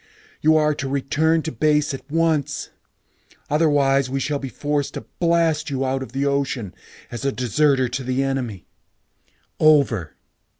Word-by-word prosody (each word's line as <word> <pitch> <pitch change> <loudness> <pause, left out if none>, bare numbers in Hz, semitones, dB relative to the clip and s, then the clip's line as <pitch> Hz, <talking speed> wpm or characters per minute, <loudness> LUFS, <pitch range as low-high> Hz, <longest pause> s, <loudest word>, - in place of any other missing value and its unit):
You 155 +1 +5
are 150 0 +3
to 140 -2 -4
return 155 +4 +1
to 160 - -3
base 150 -2 +1
at 135 +1 -8
once. 160 -2 0 0.8
Otherwise, 140 -3 +3
we 135 +1 -2
shall 145 +2 -1
be 135 - -5
forced 145 +1 -2
to - - -6
blast 165 -3 +2
you 135 -1 -1
out 130 0 -1
of 130 - -7
the 135 +2 -1
ocean 140 -7 -1 0.4
as 120 +2 -6
a 140 - +1
deserter 130 +2 +2
to 130 +2 -4
the 130 +2 0
enemy. 125 -9 -3 0.9
Over." 140 - +3
140 Hz, 155 wpm, -22 LUFS, 130-150 Hz, 0.9 s, You